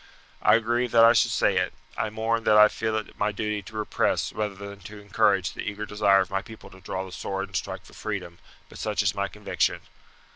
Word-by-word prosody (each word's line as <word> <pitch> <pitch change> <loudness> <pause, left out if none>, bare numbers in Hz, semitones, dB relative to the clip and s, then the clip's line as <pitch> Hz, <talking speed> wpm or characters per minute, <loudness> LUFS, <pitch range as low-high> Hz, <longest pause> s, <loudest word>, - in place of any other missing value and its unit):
I - - +6
grieve 120 +2 0
that 115 -1 +8
I 115 - +7
should - - +3
say - - +2
it. - - 0 0.2
I 110 - -1
mourn 110 +1 -1
that 105 - +5
I 105 0 +8
feel 110 -1 -2
it 110 - -7
my 105 +1 +1
duty 105 0 -3
to 105 +3 -13
repress 105 - 0
rather 105 -2 -3
than 100 0 -9
to 105 +3 -11
encourage 100 -2 +1
the - - -6
eager 105 +1 -4
desire 100 -1 +3
of 95 - -4
my 95 0 0
people 110 +2 -13
to 95 - -15
draw 95 +1 -4
the 95 - -11
sword 95 +1 -4
and - - -11
strike - - -4
for - - -16
freedom; 85 0 -5 0.3
but - - -13
such 105 -1 -1
is 100 - +2
my 100 0 -1
conviction. 105 0 -1
105 Hz, 230 wpm, -26 LUFS, 100-110 Hz, 0.3 s, that